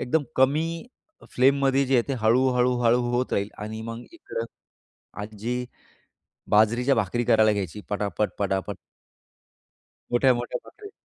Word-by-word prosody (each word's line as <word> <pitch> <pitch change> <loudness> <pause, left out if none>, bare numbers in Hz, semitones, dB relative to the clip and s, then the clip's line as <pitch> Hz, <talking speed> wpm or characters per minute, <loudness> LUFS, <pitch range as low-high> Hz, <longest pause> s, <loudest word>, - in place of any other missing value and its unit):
एकदम 150 +5 +1
कमी 160 - +1 0.4
फ्लेममध्ये 135 +1 +3
जे 135 - +1
आहे, 120 - +5
ते 135 - 0
हळू-हळू-हळू 125 +1 +3
होत 125 +1 -1
राहील 100 0 0
आणि 110 +1 -6
मग 115 +1 -6
इकडे 330 - -6 0.8
आजी 110 +4 -4 0.9
बाजरीच्या 120 +6 +4
भाकरी 115 +2 0
करायला 110 -1 +4
घ्यायची 100 0 -4
पटापट-पटापट. 100 -1 -2 1.4
मोठ्या-मोठ्या 120 -1 +2
भाकरी. 415 -1 -13
120 Hz, 110 wpm, -25 LUFS, 110-130 Hz, 1.4 s, आहे